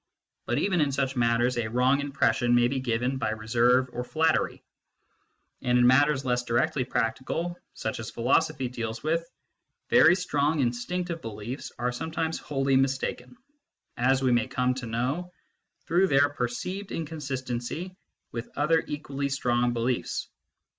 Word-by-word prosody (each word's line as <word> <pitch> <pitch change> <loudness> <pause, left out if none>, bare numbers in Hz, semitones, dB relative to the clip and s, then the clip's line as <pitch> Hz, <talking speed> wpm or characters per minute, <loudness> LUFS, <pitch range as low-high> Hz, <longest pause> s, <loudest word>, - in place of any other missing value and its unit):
But - - 0
even 185 -4 +2
in 145 -2 +2
such 135 0 -1
matters 120 +1 +2
a 110 - -1
wrong 125 +4 +3
impression 135 -4 +2
may 120 0 +5
be 130 +1 -1
given 125 +1 -1
by 110 - 0
reserve 120 +4 +2
or 125 - -3
flattery; 160 +5 0 1.0
and 125 0 +2
in 125 - +5
matters 135 +2 +4
less 125 -1 +1
directly 130 +4 +1
practical, 130 +8 -2 0.2
such 110 +1 -3
as 110 - -5
philosophy 125 +2 +1
deals 115 -1 -5
with, 165 +2 0 0.6
very 165 +2 +7
strong 155 -4 0
instinctive 165 +8 -2
beliefs 115 +4 -6
are 125 0 -1
sometimes 160 +4 -3
wholly 135 -1 0
mistaken, 135 - -1 0.6
as 130 +2 +2
we 130 - +3
may 120 -2 +2
come 125 0 0
to 125 -2 -6
know 130 +10 -2 0.5
through 180 +3 +3
their 140 -2 +4
per 125 -4 -1
ceived 190 +11 -5
inconsistency 145 +1 -4 0.4
with 115 0 -5
other 160 +3 +3
equally 140 -1 -3
strong 125 -3 +1
beliefs. 120 +1 -2
130 Hz, 145 wpm, -27 LUFS, 120-150 Hz, 1.0 s, very